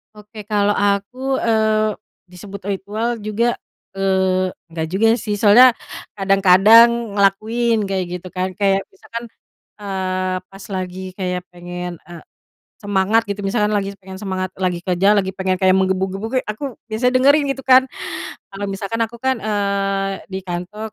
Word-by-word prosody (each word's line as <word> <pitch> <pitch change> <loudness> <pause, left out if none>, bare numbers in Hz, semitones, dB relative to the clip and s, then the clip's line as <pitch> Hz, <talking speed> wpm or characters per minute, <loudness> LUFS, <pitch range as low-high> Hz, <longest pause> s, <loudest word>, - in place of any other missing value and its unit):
Oke, 210 0 -11
kalau 205 -1 +1
aku, 205 +7 0
eee, 220 -1 +2 0.4
disebut 195 +2 -10
ritual 215 +5 -2
juga, 220 +3 -1 0.4
eee, 190 -1 +1 0.2
nggak 165 -1 -3
juga 215 +4 +3
sih. 210 -2 -3
Soalnya 240 +4 +8 0.4
kadang-kadang 205 +3 +5
ngelakuin 220 +4 +2
kayak 190 -2 -1 0.2
gitu 185 - -9
kan. 185 +1 -3
Kayak 195 0 +1
misalkan, 235 -11 -8 0.6
eee, 185 -2 -2
pas 195 +1 -14
lagi 185 -1 -4 0.2
kayak 180 -2 -2
pengen, 175 0 -7
eee, 170 -2 -11 0.6
semangat 205 +2 +1
gitu 200 0 -4
misalkan 210 +1 0
lagi 200 -1 -1
pengen 190 0 -10
semangat 185 -2 -3
lagi 180 -2 -1
kerja, 185 +2 +3
lagi 190 -1 0
pengen 190 -1 -1
kayak 185 -1 +4
menggebu-gebu 190 +1 0
ge 260 - +2
aku 240 +5 -5
biasa 235 +3 +1
dengerin 280 +4 +4
gitu 270 - -6
kan. 260 0 +7 0.7
Kalo 200 +1 -4
misalkan 195 +4 -4
aku 230 +1 -9
kan, 260 -1 0
eee, 200 -2 -1 0.2
di 190 -1 -4
kantor 190 +5 -6
200 Hz, 145 wpm, -19 LUFS, 190-220 Hz, 0.7 s, Soalnya